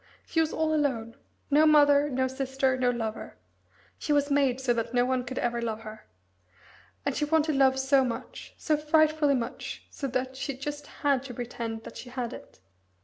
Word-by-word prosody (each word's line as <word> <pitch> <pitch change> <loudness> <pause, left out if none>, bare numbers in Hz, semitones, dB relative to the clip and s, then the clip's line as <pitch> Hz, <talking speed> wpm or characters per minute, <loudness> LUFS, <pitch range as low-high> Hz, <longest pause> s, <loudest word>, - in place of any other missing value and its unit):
She 325 - -1
was 320 -1 +2
all 315 0 0
alone 250 -7 -1 0.4
no 305 +2 +6
mother, 290 -1 +5
no 260 -1 0
sister, 265 0 0
no 255 -1 +1
lover. 225 -2 -4 0.6
She - - -3
was 285 0 +2
made 275 -3 +2
so 260 -2 +1
that 235 +1 -3
no 245 0 +4
one 255 0 0
could 255 +1 -7
ever 240 0 -1
love 225 -1 -3
her. 215 0 -10 1.0
And 280 -2 0
she - - -1
wanted 310 0 +2
love 265 -1 +4
so 265 0 +3
much 245 0 -6
so 305 - +1
frightfully 305 -1 +3
much, 235 -3 -5
so 275 - -4
that 260 0 -2
she 270 0 -4
just 290 +2 -5 0.2
had 280 -3 +3
to 250 -3 -8
pretend 230 -2 -5
that - - -10
she 250 - -9
had 245 -2 -4
it." - - -12
265 Hz, 190 wpm, -28 LUFS, 245-290 Hz, 1.0 s, no